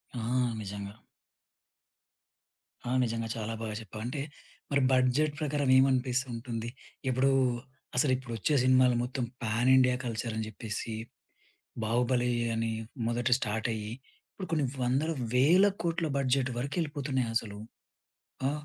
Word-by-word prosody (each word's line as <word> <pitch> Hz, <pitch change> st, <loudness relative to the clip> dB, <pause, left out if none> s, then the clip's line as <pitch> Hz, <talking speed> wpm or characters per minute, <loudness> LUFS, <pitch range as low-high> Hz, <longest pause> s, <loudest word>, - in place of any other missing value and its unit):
ఆ! -, -, -3 dB, 0.4 s
నిజంగా. 100 Hz, 0 st, -6 dB, 1.9 s
ఆ! -, -, -3 dB
నిజంగా 115 Hz, -1 st, -2 dB
చాలా 115 Hz, 0 st, -3 dB
బాగా 110 Hz, -1 st, -3 dB
చెప్పావు 110 Hz, 0 st, -8 dB
అంటే, 135 Hz, +3 st, -3 dB, 0.5 s
మరి 140 Hz, 0 st, +3 dB
బడ్జెట్ 130 Hz, +4 st, +3 dB
ప్రకారం 145 Hz, -2 st, 0 dB
ఏమని 135 Hz, +1 st, +6 dB
అనిపిస్తుంటుంది? 125 Hz, -2 st, -2 dB, 0.4 s
ఇప్పుడు, 130 Hz, +2 st, +3 dB, 0.6 s
అసలిప్పుడు 130 Hz, -2 st, +1 dB
ఒచ్చే 145 Hz, +8 st, +1 dB
సినిమాలు 130 Hz, -1 st, +5 dB
మొత్తం 125 Hz, +1 st, -3 dB, 0.2 s
పాన్ 115 Hz, +3 st, +2 dB
ఇండియా 125 Hz, -1 st, +5 dB
కల్చర్ 115 Hz, -1 st, -3 dB
అని 110 Hz, -, -1 dB
జెప్పేసి, 110 Hz, +1 st, -5 dB, 0.9 s
'బాహుబలి' 125 Hz, +2 st, +1 dB, 0.3 s
అని 115 Hz, 0 st, 0 dB, 0.4 s
మొదటి 120 Hz, +2 st, +2 dB
స్టార్ట్ 110 Hz, -1 st, -1 dB
అయ్యి, 105 Hz, -1 st, -5 dB, 0.4 s
ఇప్పుడు 190 Hz, -, -7 dB
కొన్ని 150 Hz, -3 st, +2 dB, 0.2 s
వందల, 135 Hz, +6 st, +1 dB, 0.2 s
వేల 165 Hz, +10 st, +6 dB, 0.2 s
కోట్ల 170 Hz, 0 st, 0 dB
బడ్జెట్ 130 Hz, -1 st, +2 dB
వరకెళ్ళిపోతున్నాయి 140 Hz, -2 st, -1 dB
అసలు. 105 Hz, -3 st, -1 dB, 0.9 s
ఆ! -, -, +1 dB
125 Hz, 120 wpm, -30 LUFS, 115-135 Hz, 1.9 s, ఏమని